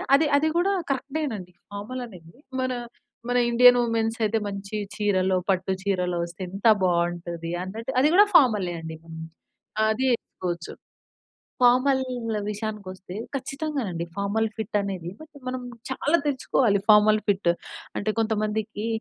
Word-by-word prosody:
అది 305 +2 +3
అది 315 +2 +2
కూడా 380 +3 +3 0.2
కరెక్టేనండి. 265 - -3 0.2
ఫార్మల్ 245 +5 -5
అనేది 170 -6 -14 0.3
మన, 255 0 0 0.6
మన 245 - +2
ఇండియన్ 245 +1 +7
వుమెన్స్ 230 -1 0
అయితే 220 +1 +1
మంచి 200 +1 -6 0.2
చీరలో, 190 -3 +2
పట్టు 190 0 +1
చీరలో 180 -3 0
వస్తే 175 +2 -11
ఎంత 195 +4 -8 0.2
బావుంటది 170 -1 -1
అన్నట్టు 225 +7 -5
అది 275 - +5
కూడా 410 - +8
ఫార్మలే 210 - +5
అండి. 160 0 -7 0.9
అది 220 +4 0
ఏసుకోచ్చు. 175 -5 -6 0.9
ఫార్మల్ 255 +2 +5 0.5
విషయానికొస్తే 200 -3 -6 0.2
ఖచ్చితంగానండి 275 - -3
ఫార్మల్ 200 +3 0
ఫిట్ 220 -1 -1
అనేది, 185 -4 -4
బట్, 315 0 -14
మనం 255 0 -3 0.3
చాలా 295 +5 +2
తెచ్చుకోవాలి 255 -6 +2
ఫార్మల్ 215 0 +7
ఫిట్. 190 -3 +3 0.5
అంటే 215 +1 0
కొంతమందికి 215 0 -1
215 Hz, 125 wpm, -25 LUFS, 185-250 Hz, 0.9 s, కూడా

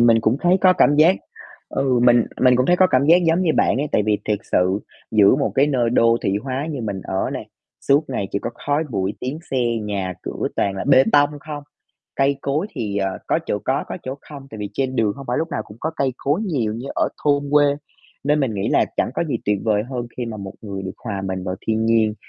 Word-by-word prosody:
mình 115 -1 +5
cũng 115 +3 +2
thấy 180 +1 +4
có 185 -1 +6
cảm 145 -5 +3
giác 165 +5 +6 0.5
ừ, 130 -3 +1
mình 120 -2 +5 0.2
mình 125 -1 +5
cũng 130 - +2
thấy 175 - +4
có 185 - +5
cảm 140 -4 +2
giác 170 +2 +7
giống 165 +3 +3
như 170 - +2
bạn - - +3
ấy 140 +3 0
tại 105 - +3
vì 105 -1 +2
thiệt 105 -2 0
sự 95 +2 +2 0.3
giữa 105 -3 +5
một 100 - -1
cái 140 +4 +4
nơi 125 -5 +1
đô 115 -1 +4
thị 95 - +1
hóa 135 +3 -3
như 140 -4 -4
mình 100 -3 -3
ở 95 - -2
này, - - -5 0.4
suốt 145 +3 +4
ngày 100 -6 -2
chỉ 100 - +1
có 115 - -4 0.2
khói 145 +3 +1
bụi, 100 -2 -1
tiếng 135 +5 -4
xe, 135 - -1 0.3
nhà 100 -3 -3
cửa - - -3
toàn 100 - 0
là - - -3
bê 135 -1 +7
tông 145 0 +5
không. 150 -2 -7 0.5
Cây 140 0 +2
cối 150 +7 -1
thì, 105 -3 -3
ờ, 95 -1 -1
có - - +2
chỗ - - -1
có, - - 0
có - - -5
chỗ 130 - -4
không 140 -2 -10
tại 110 - -9
vì 105 -1 -5
trên 130 0 -1
đường 105 -3 +2
hông 140 - -9
phải 125 - 0
lúc 165 - -1
nào 110 - -2
cũng 105 - -14
có 160 - -1
cây 135 -2 0
cối 145 +9 0
nhiều 135 - -1
như 120 +4 -6
ở - - +1 0.2
thôn 145 -1 +3
quê. 150 0 +6 0.6
Nên 150 +1 +2
mình 120 -6 0
nghĩ 100 - -1
là - - +3
chẳng - - +1
có - - 0
gì 145 -7 -1
tuyệt 105 0 +1
vời 105 -2 +2
hơn 120 -2 -3
khi 120 -2 -3
mà 110 - -5
một 100 -2 -7
người 100 -2 -5
được 95 - -5
hòa 100 -4 -3
mình 95 -1 -3
vào 95 - -2
thiên 110 0 +1
nhiên, 110 -2 +3
120 Hz, 255 wpm, -21 LUFS, 105-145 Hz, 0.6 s, giác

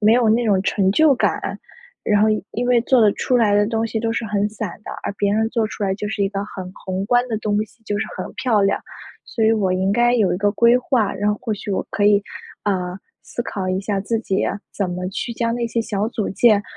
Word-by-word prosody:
没 215 +1 +5
有 240 -2 +3
那 230 +2 +3
种 200 -4 +2
成 195 -1 +1
就 310 +4 +5
感。 - - -1 0.4
然 210 -1 +2
后 215 - +4 0.2
因 245 +2 -2
为 245 -1 +4
做 255 +1 +3
的 215 -2 +6
出 250 - 0
来 220 -4 +3
的 205 0 +3
东 225 0 0
西 225 - -3
都 225 0 -1
是 230 - -2
很 205 0 0
散 210 -1 -5
的， - - -6
而 - - -3
别 200 -1 +2
人 220 +1 +1
做 230 -3 +1
出 215 - -7
来 195 -1 +1
就 210 +1 -4
是 210 -1 -2
一 195 - +2
个 195 0 -3
很 185 -3 -8
宏 190 0 -4
观 245 +3 +2
的 225 - -1
东 210 -1 0
西， 225 +2 -25
就 205 -1 -2
是 - - -1
很 185 - -5
漂 240 -6 +1
亮。 195 - +1 0.4
所 225 - -1
以 220 - +5
我 200 -4 +1
应 190 +1 +1
该 240 +3 +3
有 215 -6 +2
一 - - 0
个 205 +2 +2
规 235 +3 +5
划， 245 -5 +1
然 205 +2 -1
后 210 - -1
或 230 -3 -1
许 210 - -7
我 195 - -1
可 205 - 0
以， 205 0 +5 0.4
呃， 185 -3 -1 0.3
思 240 - -4
考 195 -5 -4
一 185 +1 0
下 200 0 -2
自 225 +3 -1
己， 195 -4 0 0.3
怎 195 -3 -2
么 180 +1 -3
去 195 +5 -4
将 230 0 -1
那 235 0 -1
些 230 0 -1
小 210 -1 -1
组 220 -3 -3
件， 205 +1 +4
210 Hz, 275 characters per minute, -21 LUFS, 200-230 Hz, 0.4 s, 的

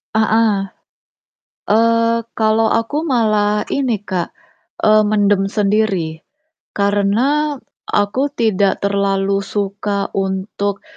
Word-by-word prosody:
Heeh, 220 -2 +2 1.1
eee, 230 +1 +2
kalo 220 0 +2
aku 295 +8 -2
malah 215 -5 +1
ini, 245 -7 -1
Kak, 185 -4 -4 0.5
eee, 215 0 +5
mendem 205 -2 +2
sendiri, 195 -6 0 0.6
karena 215 +10 +1 0.4
aku 205 +6 +1
tidak 205 -6 +1
terlalu 200 0 0
suka 200 0 -3
untuk, 195 +1 -2
210 Hz, 90 wpm, -17 LUFS, 200-225 Hz, 1.1 s, eee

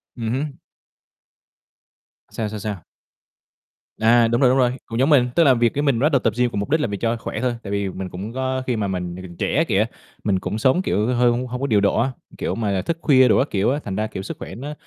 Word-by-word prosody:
Ừm 115 -3 -3
hứm. 140 +2 -3 1.7
Sao, 110 -2 -3
sao, 105 0 -6
sao? 100 -4 -5 1.1
À, 115 +1 +5
đúng 120 +3 +1
rồi, 130 - +6
đúng 130 - +3
rồi, 125 -2 +3
cũng 115 +1 -4
giống 135 - +3
mình, 130 -5 +4
tức 170 - +5
là 135 -4 +6
việc 120 -1 +2
cái 145 - -1
mình 140 -6 +2
bắt 150 - +3
đầu 135 - +4
tập 115 -3 0
gym 125 -1 +2
cùng 100 - -2
mục 100 - -3
đích 160 - +2
là 150 - 0
vì 100 -1 -4
cho 115 +3 0
khỏe - - -5
thôi, 125 -1 0
tại 100 - -6
vì 100 -1 -1
mình 95 0 -6
cũng 100 +6 -7
có 130 0 -2
khi 125 - +1
mà 105 -2 -1
mình 90 -2 -3
mình 95 - -9
còn 85 - -12
trẻ 160 - +1
kìa, 105 +3 +2 0.4
mình 100 -3 +1
cũng 105 - -3
sống, 130 +10 +3
kiểu, 105 - 0
hơi 125 -1 +3
hông 125 +2 -2
hông 125 +1 -5
có 140 - 0
điều 105 -3 +3
độ 100 - +2
á, 130 +3 +1 0.3
kiểu - - -2
mà, 110 -3 -1
là 95 -1 0
thức 165 - -2
khuya 130 -4 +5
đồ 110 - +4
các 135 - +2
kiểu 100 +4 +1
á, 145 - -1
thành 95 - -4
ra, 110 +2 -1
kiểu, 95 -3 -6
sức - - -6
khỏe - - -8
nó 140 +6 -6
115 Hz, 275 wpm, -22 LUFS, 100-130 Hz, 1.7 s, rồi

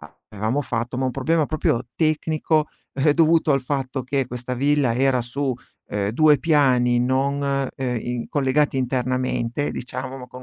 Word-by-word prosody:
a - - -14
avevamo 110 +6 -1
fatto 120 -2 -3
ma 130 - 0
un - - 0
problema 150 +4 +1
proprio 130 -6 0
tecnico, 155 -1 +1 0.2
eh, 145 +2 +2
dovuto 165 -2 +4
al 135 -1 +1
fatto 130 0 -2
che 135 +1 -1
questa 125 +1 -5
villa 140 -1 +2
era 130 0 +2
su, 130 +2 -2 0.3
ehm, 100 -1 -1
2 150 +5 +4
piani 130 -6 +3
non 135 +3 +1 0.4
ehm, 125 -2 -2
in 120 0 -4
collegati 145 -1 +1
internamente 130 +1 -1
diciamo, 130 +1 -6
ma 125 - -9
con 125 +1 -11
130 Hz, 160 wpm, -22 LUFS, 125-145 Hz, 0.4 s, dovuto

